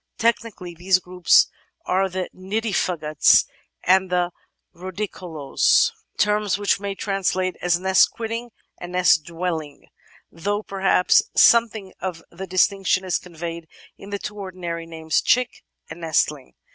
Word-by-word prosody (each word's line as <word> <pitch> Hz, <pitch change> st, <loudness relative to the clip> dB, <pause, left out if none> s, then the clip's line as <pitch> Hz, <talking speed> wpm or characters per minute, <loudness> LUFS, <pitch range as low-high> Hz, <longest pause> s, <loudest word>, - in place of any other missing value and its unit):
Technically 225 Hz, -6 st, -1 dB
these 180 Hz, +3 st, +2 dB
groups 180 Hz, 0 st, +3 dB, 0.4 s
are 190 Hz, +1 st, +1 dB
the 185 Hz, 0 st, -3 dB
nidifugotts 185 Hz, -6 st, +2 dB, 0.4 s
and 190 Hz, 0 st, +3 dB
the 180 Hz, -1 st, 0 dB, 0.4 s
rUdicolous, 185 Hz, -, 0 dB, 0.3 s
terms 210 Hz, -1 st, +1 dB
which 205 Hz, 0 st, +1 dB
we -, -, -15 dB
may 195 Hz, -, -4 dB
translate 185 Hz, -2 st, -1 dB
as 175 Hz, -1 st, +1 dB
nest 190 Hz, +1 st, +4 dB
quitting 230 Hz, +1 st, -5 dB, 0.3 s
and 175 Hz, 0 st, -8 dB
nest 175 Hz, -4 st, +4 dB
dwelling, 165 Hz, -3 st, -5 dB, 0.4 s
though 205 Hz, +6 st, -3 dB
perhaps 190 Hz, -2 st, +2 dB
something 225 Hz, -4 st, +4 dB
of 180 Hz, -3 st, -5 dB
the 190 Hz, +3 st, -8 dB
distinction 190 Hz, +1 st, +1 dB
is 185 Hz, -, 0 dB
conveyed 170 Hz, -1 st, -7 dB, 0.3 s
in 195 Hz, -, -12 dB
the 200 Hz, -, -3 dB
two 210 Hz, +1 st, -7 dB
ordinary 175 Hz, -3 st, -6 dB
names 160 Hz, -1 st, -1 dB
"chick" 250 Hz, 0 st, +1 dB, 0.2 s
and 175 Hz, -, -10 dB
"nestling." 150 Hz, -4 st, -1 dB
185 Hz, 130 wpm, -22 LUFS, 170-200 Hz, 0.4 s, nest